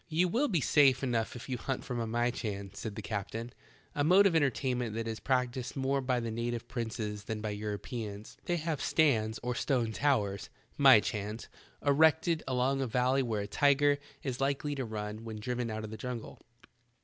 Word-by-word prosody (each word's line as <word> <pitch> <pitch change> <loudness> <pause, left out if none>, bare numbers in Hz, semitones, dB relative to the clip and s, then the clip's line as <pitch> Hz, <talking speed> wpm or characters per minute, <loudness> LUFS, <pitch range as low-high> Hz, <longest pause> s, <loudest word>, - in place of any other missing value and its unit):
"You 170 +3 +2
will 245 +11 +1
be 175 - +1
safe 135 -2 +4
enough 120 -3 0
if 120 - -8
you 125 -2 -3
hunt 135 -2 -3
from 125 -1 -3
a 115 - -2
myehan," 110 -4 -2
said 110 -3 -5
the 110 - -6
eaptain, 115 +3 -4 0.4
"a 145 - 0
mode 185 +6 +6
of 185 -4 +4
entertain 135 -4 +1
ment 115 -3 -3
that 115 0 -3
is 110 -1 -4
praetieed 125 -1 -1
more 135 0 0
by 125 -1 0
the 115 -1 -3
native 115 +1 -3
prinees 110 -4 -4
than 110 0 -3
by 105 0 -3
Europeans. 105 0 -5
They 175 - +1
have 160 -2 -2
stands 115 -8 +2
or 125 0 -1
stone 120 -2 0
towers 105 -5 0 0.3
(myehans) 105 +2 +4 0.4
ereeted 160 +3 +4
along 130 +1 +1
a 135 - 0
valley 125 +3 +2
where 115 -5 -1
a 100 - -4
tiger 145 +4 +3 0.2
is 130 -2 -3
likely 140 +2 0
to 135 -3 -3
run 105 0 -5
when 110 -2 -6
driven 125 +1 -2
out 110 0 -4
of 110 - -6
the 110 - -6
jungle. 125 -2 -6
125 Hz, 190 wpm, -31 LUFS, 110-135 Hz, 0.4 s, mode